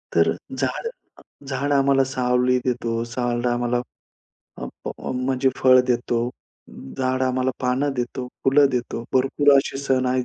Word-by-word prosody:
तर -, -, +4 dB, 0.3 s
झाड -, -, -2 dB, 0.6 s
झाड 140 Hz, +2 st, -2 dB
आम्हाला 135 Hz, -1 st, +4 dB
सावली 125 Hz, -1 st, +1 dB
देतो, 115 Hz, -2 st, -1 dB
झाड 120 Hz, +1 st, -2 dB
आम्हाला 120 Hz, 0 st, 0 dB, 0.8 s
अ, -, -, -5 dB, 0.2 s
फ -, -, -3 dB, 0.3 s
म्हणजे 130 Hz, +1 st, +1 dB
फळ 130 Hz, -1 st, +6 dB
देतो, 120 Hz, -1 st, 0 dB, 0.7 s
झाड 130 Hz, 0 st, 0 dB
आम्हाला 130 Hz, 0 st, +1 dB
पानं 130 Hz, +3 st, +1 dB
देतो, 125 Hz, +1 st, -3 dB, 0.2 s
फुलं 140 Hz, +2 st, +5 dB
देतो. 120 Hz, -2 st, -3 dB
भरपूर 135 Hz, +2 st, +3 dB
असे 135 Hz, 0 st, 0 dB
सण 130 Hz, -2 st, 0 dB
आहेत, 125 Hz, 0 st, +1 dB
130 Hz, 135 wpm, -22 LUFS, 125-135 Hz, 0.8 s, फळ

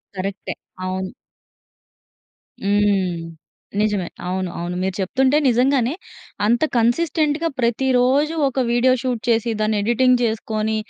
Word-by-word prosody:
కరెక్టే. 195 Hz, +1 st, -4 dB, 0.3 s
అవును. 185 Hz, 0 st, -3 dB, 1.5 s
హ్మ్. 200 Hz, -4 st, +1 dB, 0.6 s
నిజమే. 205 Hz, -4 st, 0 dB, 0.2 s
అవును, 185 Hz, 0 st, -2 dB
అవును. 175 Hz, +1 st, -4 dB
మీరు 190 Hz, 0 st, -1 dB
చెప్తుంటే 265 Hz, +9 st, +2 dB
నిజంగానే 250 Hz, +1 st, +2 dB, 0.5 s
అంత 235 Hz, +6 st, +2 dB
కన్సిస్టెంట్‌గా 300 Hz, +6 st, +1 dB
ప్రతిరోజు 260 Hz, +5 st, +2 dB
ఒక 270 Hz, 0 st, -2 dB
వీడియో 240 Hz, +2 st, +3 dB
షూట్ 250 Hz, -4 st, -2 dB
చేసి 230 Hz, 0 st, +2 dB
దాన్ని 215 Hz, 0 st, +1 dB
ఎడిటింగ్ 250 Hz, +3 st, +3 dB
చేసుకొని 220 Hz, -1 st, -1 dB
230 Hz, 105 wpm, -21 LUFS, 200-260 Hz, 1.5 s, వీడియో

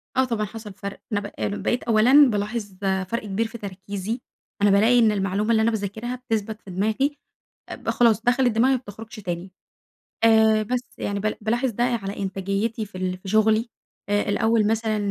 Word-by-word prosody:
آه 260 Hz, -, +4 dB
طبعًا 230 Hz, -4 st, -1 dB
حصل 210 Hz, -1 st, -9 dB
فرْق، 200 Hz, +1 st, -7 dB
أنا 205 Hz, -, +1 dB
ب 205 Hz, 0 st, -8 dB, 0.3 s
بقيت 245 Hz, -, 0 dB
أولًا 250 Hz, +5 st, +6 dB
بالاحظ 210 Hz, 0 st, -2 dB
آآ 190 Hz, -1 st, +1 dB
فرق 230 Hz, +5 st, -3 dB
كبير 210 Hz, +3 st, -1 dB
في 230 Hz, +1 st, -9 dB
تركيزي، 200 Hz, +3 st, -5 dB, 0.4 s
أنا 205 Hz, -, +5 dB
بالاقي 220 Hz, +5 st, +5 dB
إن 220 Hz, -2 st, +5 dB
المعلومة 200 Hz, +2 st, 0 dB
اللي 220 Hz, -1 st, +4 dB
أنا 230 Hz, -, +3 dB
باذاكرها 220 Hz, +3 st, -3 dB
بتثبت 225 Hz, -3 st, -3 dB
في 190 Hz, -, -11 dB
دماغي 220 Hz, +10 st, 0 dB, 0.5 s
اب -, -, -5 dB
خلاص 230 Hz, -2 st, +3 dB
دخلت 245 Hz, +1 st, +3 dB
دماغي 245 Hz, +5 st, +3 dB
ما 255 Hz, -, +1 dB
بتخرجش 225 Hz, -1 st, -11 dB
تاني. 180 Hz, -1 st, -5 dB, 0.7 s
آآ 220 Hz, -1 st, +5 dB
بس 250 Hz, +3 st, -3 dB
يعني 200 Hz, 0 st, -2 dB
ب 215 Hz, +1 st, -1 dB
بالاحظ 235 Hz, +4 st, 0 dB
ده 240 Hz, +2 st, 0 dB
على 225 Hz, -5 st, -2 dB
إنتاجيتي 195 Hz, +4 st, -2 dB
في 185 Hz, -, -10 dB
ال 185 Hz, 0 st, -2 dB
في 190 Hz, -, -11 dB
شغلي، 220 Hz, +3 st, +3 dB, 0.4 s
آآ 205 Hz, 0 st, +2 dB
الأوّل 220 Hz, +1 st, +2 dB
مثلًا 220 Hz, 0 st, 0 dB
220 Hz, 185 wpm, -24 LUFS, 200-230 Hz, 0.7 s, أولًا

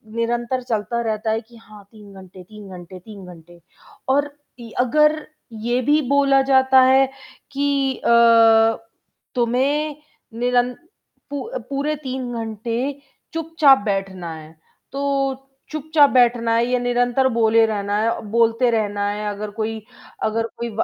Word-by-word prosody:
निरंतर 240 Hz, +2 st, -1 dB
चलता 230 Hz, +1 st, -1 dB
रहता 220 Hz, -1 st, -2 dB
है 220 Hz, +1 st, -1 dB
कि 235 Hz, +1 st, -19 dB
हाँ, 210 Hz, -1 st, -15 dB
3 210 Hz, -2 st, -15 dB
घंटे, 185 Hz, 0 st, -14 dB
3 210 Hz, +1 st, -13 dB
घंटे, 180 Hz, +1 st, -11 dB
3 200 Hz, 0 st, -12 dB
घंटे 170 Hz, +1 st, -17 dB, 0.5 s
और 285 Hz, +2 st, +1 dB, 0.3 s
इ 230 Hz, -1 st, -10 dB
अगर 300 Hz, +5 st, +2 dB, 0.3 s
ये 240 Hz, +3 st, -1 dB
भी 295 Hz, +5 st, +2 dB
बोला 275 Hz, -1 st, +4 dB
जाता 265 Hz, -1 st, +4 dB
है 265 Hz, +1 st, +5 dB, 0.5 s
कि 275 Hz, -1 st, 0 dB
अ, 230 Hz, -1 st, +5 dB, 0.6 s
तुम्हें 270 Hz, +5 st, 0 dB, 0.4 s
निरंत 245 Hz, 0 st, 0 dB, 0.5 s
पू 285 Hz, -1 st, -4 dB, 0.3 s
पूरे 280 Hz, +2 st, -2 dB
3 260 Hz, -3 st, -5 dB
घंटे 225 Hz, 0 st, -4 dB, 0.6 s
चुपचाप 320 Hz, -4 st, +4 dB
बैठना 195 Hz, -4 st, -3 dB
है। 155 Hz, 0 st, -12 dB, 0.4 s
तो 275 Hz, +1 st, -5 dB, 0.7 s
चुपचाप 305 Hz, -1 st, +3 dB
बैठना 240 Hz, -2 st, +2 dB
है 230 Hz, +1 st, +2 dB
या 250 Hz, 0 st, 0 dB
निरंतर 245 Hz, +1 st, +1 dB
बोले 225 Hz, 0 st, +4 dB
रहना 205 Hz, -2 st, -2 dB
है 230 Hz, +1 st, -1 dB
बोलते 230 Hz, +2 st, +2 dB
रहना 205 Hz, -2 st, -1 dB
है 210 Hz, +1 st, -4 dB
अगर 205 Hz, +1 st, -5 dB
कोई 220 Hz, 0 st, -3 dB, 0.4 s
अगर 225 Hz, +1 st, -1 dB
कोई 235 Hz, 0 st, -4 dB
235 Hz, 135 wpm, -21 LUFS, 215-265 Hz, 0.7 s, है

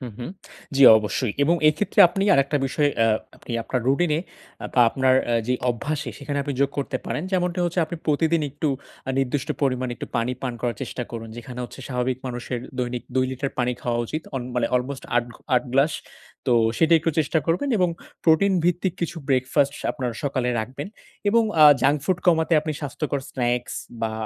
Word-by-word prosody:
হু, 130 Hz, -, -6 dB
হুম। 125 Hz, -, -5 dB, 0.5 s
জ্বী, 140 Hz, -, +7 dB
অবশ্যই। 105 Hz, +1 st, -2 dB
এবং 170 Hz, +3 st, +3 dB
এইক্ষেত্রে 155 Hz, +7 st, +1 dB
আপনি 195 Hz, +2 st, -1 dB
আরেকটা 140 Hz, +2 st, +2 dB
বিষয় 145 Hz, +1 st, +1 dB
আ -, -, +4 dB, 0.3 s
আপনি -, -, -9 dB
আপনার 125 Hz, +2 st, -2 dB
রুটিনে 150 Hz, +3 st, +2 dB, 0.5 s
আ -, -, -1 dB
বা 125 Hz, -, +5 dB
আপনার 130 Hz, -1 st, +3 dB, 0.2 s
আ -, -, +3 dB
যে 125 Hz, -, +3 dB, 0.2 s
অভ্যাসে, 145 Hz, +6 st, -3 dB
সেখানে 145 Hz, 0 st, -3 dB
আপনি 140 Hz, -1 st, -3 dB
যোগ 140 Hz, 0 st, +3 dB
করতে 135 Hz, -1 st, -1 dB
পারেন। 150 Hz, -, -2 dB
যেমনটা 180 Hz, -1 st, 0 dB
হচ্ছে 175 Hz, 0 st, 0 dB
আপনি 170 Hz, -, -6 dB
প্রতিদিন 160 Hz, +2 st, +2 dB
একটু 145 Hz, +2 st, -2 dB, 0.4 s
আ -, -, +1 dB
নির্দিষ্ট 135 Hz, 0 st, -1 dB
পরিমাণ, 130 Hz, -2 st, +1 dB
একটু -, -, -7 dB
পানি 115 Hz, +2 st, 0 dB
পান 130 Hz, -, -2 dB
করার 120 Hz, -3 st, -1 dB
চেষ্টা 125 Hz, -, -4 dB
করুন। 115 Hz, -1 st, -6 dB
যেখানে 125 Hz, +1 st, -8 dB
হচ্ছে 130 Hz, -, -10 dB
স্বাভাবিক 125 Hz, 0 st, -1 dB
মানুষের, 125 Hz, 0 st, -4 dB, 0.2 s
দৈনিক 125 Hz, -1 st, -2 dB
২ 130 Hz, 0 st, +3 dB
লিটার 135 Hz, +1 st, -3 dB
পানি 125 Hz, 0 st, +1 dB
খাওয়া 120 Hz, -1 st, -1 dB
উচিত। 155 Hz, +5 st, -4 dB
অন 130 Hz, -, -2 dB
মানে 120 Hz, -2 st, +1 dB
অলমোস্ট 130 Hz, +2 st, -2 dB
৮ 120 Hz, -, +3 dB
ঘ -, -, -13 dB, 0.2 s
৮ 125 Hz, -, +3 dB
গ্লাস। 140 Hz, +4 st, +3 dB, 0.5 s
তো, 125 Hz, -, +3 dB, 0.2 s
সেটাই 165 Hz, 0 st, +5 dB
একটু 165 Hz, -, +1 dB
চেষ্টা 155 Hz, +1 st, +2 dB
করবেন 180 Hz, +12 st, +1 dB
এবং 180 Hz, -, +3 dB, 0.4 s
প্রোটিন 165 Hz, +5 st, +4 dB
ভিত্তিক 175 Hz, +1 st, +1 dB
কিছু 170 Hz, 0 st, -2 dB
ব্রেকফাস্ট 135 Hz, +2 st, +2 dB, 0.2 s
আপনার 125 Hz, -5 st, -3 dB
সকালে 130 Hz, -3 st, -1 dB
রাখবেন। 130 Hz, -, -6 dB, 0.4 s
এবং 230 Hz, +2 st, +4 dB, 0.2 s
আ -, -, +10 dB, 0.2 s
জাঙ্ক 145 Hz, +3 st, +4 dB
ফুড 185 Hz, -1 st, +1 dB
কমাতে 165 Hz, -1 st, +3 dB
আপনি 155 Hz, 0 st, -3 dB
স্বাস্থ্যকর 140 Hz, 0 st, -3 dB
স্ন্যাক্স 120 Hz, -1 st, -1 dB, 0.3 s
বা 110 Hz, -1 st, 0 dB
140 Hz, 190 wpm, -24 LUFS, 125-160 Hz, 0.5 s, আ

